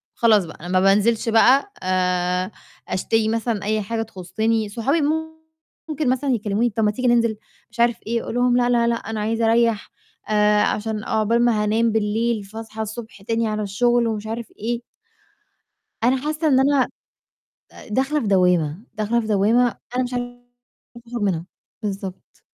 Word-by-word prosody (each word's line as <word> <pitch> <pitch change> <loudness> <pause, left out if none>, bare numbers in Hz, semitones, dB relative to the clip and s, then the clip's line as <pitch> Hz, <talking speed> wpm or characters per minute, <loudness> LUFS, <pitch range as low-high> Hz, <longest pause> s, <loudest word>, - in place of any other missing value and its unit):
فخلاص 215 -5 +4
بقى 160 - -11
أنا 175 - -7
ما 185 +1 +2
بانزلش 210 +4 +3
بقى 265 - +4
آآ، 180 +1 0 0.4
أشتري 220 +4 0
مثلًا 225 -2 -1
أي 215 +1 0
حاجة 225 +3 -3
تخُصِّني، 220 +2 -2
صحابي 270 +9 0 0.9
ممكن 300 -3 -1
مثلًا 260 +2 0
يكلّموني 220 +1 0
طَب 220 +1 -1
ما 210 - +3
تيجي 250 +3 -2
ننزل 230 -2 +3 0.3
مش 235 - -15
عارف 235 -1 +3
إيه 230 0 -1
أقول - - -5
لهم 245 0 +3
لأ، 245 0 +2
لأ، 235 -1 +3
لأ 235 - +2
أنا 220 -1 -5
عايزة 225 +2 0
أريّح 230 -2 +1 0.4
آآ، 210 0 +3
عشان 215 0 -2
عقبال 230 +2 +1
ما 215 -3 +2
هانام 225 +2 +2
بالليل 220 +1 0
فاصحى 220 +2 -8
الصبح 220 -1 -7
تاني 225 +1 -1
على 215 0 -2
الشغل، 240 +4 +2
ومش 215 -1 -3
عارف 225 0 -4
إيه 235 +2 -2 1.2
أنا 255 +2 +4
حاسة 305 +3 -1
إن 265 -2 +4
أنا 275 -1 +3 0.8
آآ، - - -13
داخلة 270 +7 0
في 225 - -3
دوّامة، 180 -1 +2
داخلة 220 +2 0
في 220 - -5
دوّامة 220 +4 +2 0.2
أنا 255 - +2
مش 245 - -6
عارفة 245 0 -5 0.7
أخرج 235 -2 -4
منها، 175 -4 -1 0.4
بالضبط. 195 -2 -6
225 Hz, 165 wpm, -22 LUFS, 210-240 Hz, 1.2 s, فخلاص